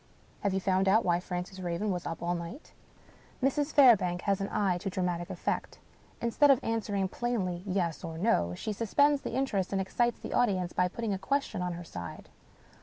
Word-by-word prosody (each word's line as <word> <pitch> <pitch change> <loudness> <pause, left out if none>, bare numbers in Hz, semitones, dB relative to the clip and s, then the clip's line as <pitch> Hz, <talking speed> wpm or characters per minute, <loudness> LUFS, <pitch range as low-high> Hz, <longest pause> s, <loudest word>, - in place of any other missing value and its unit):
Have 200 -2 0
you - - +2
found 190 0 +1
out 220 +4 +4
why 175 -1 +3
Francis 180 +1 -5
Raven 180 +3 -2
was 180 -2 -3
up 165 0 -5
all 175 +1 0
night? 175 - -7 0.3
" - - -21
Mrs. 290 +2 +1
Fairbank 210 -11 +5
has 200 -1 0
an 195 - -2
eye 185 -4 +1
to 195 - -3
dramatic 180 -2 -2
effect. - - -3 0.4
Instead 235 +5 +3
of 270 -3 +6
answering 205 -4 -1
plainly, 190 -5 -2
Yes 180 -4 -1
or 165 -1 -5
No, 125 - +1
she 215 - -3
suspends 285 +7 +2
the - - -4
interest 215 -9 0
and 195 - 0
excites 240 +5 0
the - - -6
audience 185 -7 +1
by 180 - +2
putting 220 +3 -3
a 190 - -3
question 275 -3 -1
on 180 -1 -2
her 175 +1 -7
side. 90 - -8
190 Hz, 195 wpm, -30 LUFS, 180-230 Hz, 0.4 s, of